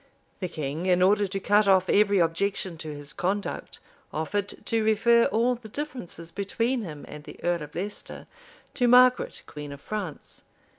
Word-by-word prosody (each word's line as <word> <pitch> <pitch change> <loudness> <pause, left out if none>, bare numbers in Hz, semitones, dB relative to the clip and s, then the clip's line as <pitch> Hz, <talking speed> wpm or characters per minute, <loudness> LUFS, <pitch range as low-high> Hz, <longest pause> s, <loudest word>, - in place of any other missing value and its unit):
[*] - - -40
The 185 - -2
king, 155 +2 -4
in 180 0 +4
order 205 +2 +4
to 195 +1 -3
cut 205 +1 +3
off 190 -1 +5
every 205 0 +4
objection 180 +2 0
to 160 - -6
his 145 0 -7
conduct, 200 +3 -3 0.3
offered 200 +6 -3
to 225 -1 +1
refer 230 +2 +4
all 235 +4 +2
the 235 -2 -9
differences 230 - -6
between 230 +7 -1
him 155 -8 -7
and 150 0 -9
the - - -11
earl 175 -1 +1
of 150 0 -9
Leicester 205 +4 -6 0.5
to 245 -3 +2
Margaret, 250 +1 +5
queen 150 -1 -8
of 140 - -8
France. 195 -4 -6
195 Hz, 175 wpm, -26 LUFS, 165-220 Hz, 0.5 s, off